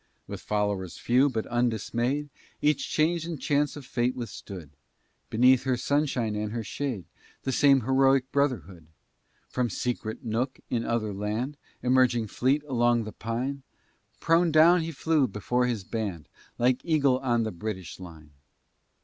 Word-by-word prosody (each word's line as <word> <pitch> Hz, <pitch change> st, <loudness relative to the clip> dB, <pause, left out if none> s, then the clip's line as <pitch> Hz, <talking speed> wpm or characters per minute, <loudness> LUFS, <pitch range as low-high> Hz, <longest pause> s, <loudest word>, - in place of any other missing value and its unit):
With -, -, -7 dB
followers 105 Hz, -4 st, -2 dB
few, 130 Hz, +4 st, +3 dB
but 110 Hz, -4 st, -2 dB
undismay'd, 120 Hz, +4 st, -1 dB, 0.3 s
Each 150 Hz, -1 st, +1 dB
change 160 Hz, +2 st, +1 dB
and 165 Hz, -3 st, -5 dB
chance 145 Hz, +1 st, +1 dB
of 145 Hz, -3 st, -9 dB
fate 125 Hz, 0 st, 0 dB
withstood, 100 Hz, -, -8 dB, 0.6 s
Beneath 125 Hz, +3 st, +5 dB
her 130 Hz, -2 st, 0 dB
sunshine 135 Hz, -6 st, 0 dB
and 105 Hz, 0 st, -2 dB
her 115 Hz, -1 st, -3 dB
shade, 110 Hz, -, -4 dB, 0.4 s
The 135 Hz, -, -1 dB
same 135 Hz, 0 st, +5 dB
heroic 135 Hz, +1 st, +3 dB
brotherhood! 120 Hz, -, -1 dB, 0.6 s
From 125 Hz, -2 st, -1 dB
secret 110 Hz, +1 st, -3 dB
nook, 120 Hz, +4 st, -2 dB
in 115 Hz, -1 st, 0 dB
other 110 Hz, -3 st, -1 dB
land, 105 Hz, +8 st, -3 dB, 0.3 s
Emerging 125 Hz, -2 st, +3 dB
fleet 135 Hz, +7 st, +1 dB
along 120 Hz, -4 st, +2 dB
the 110 Hz, -, -6 dB
pine, 125 Hz, +7 st, -3 dB, 0.6 s
Prone 165 Hz, +1 st, +3 dB
down 165 Hz, +3 st, +6 dB
he 165 Hz, +1 st, -3 dB
flew 155 Hz, -2 st, +1 dB
before 125 Hz, +4 st, 0 dB
his 115 Hz, -5 st, -2 dB
band, 95 Hz, -7 st, -4 dB, 0.3 s
Like 125 Hz, +1 st, +2 dB
eagle 140 Hz, -6 st, +2 dB
on 120 Hz, -3 st, +1 dB
the 110 Hz, -, -2 dB
British 95 Hz, -1 st, -6 dB
line! 80 Hz, -4 st, -11 dB
125 Hz, 145 wpm, -27 LUFS, 110-140 Hz, 0.6 s, down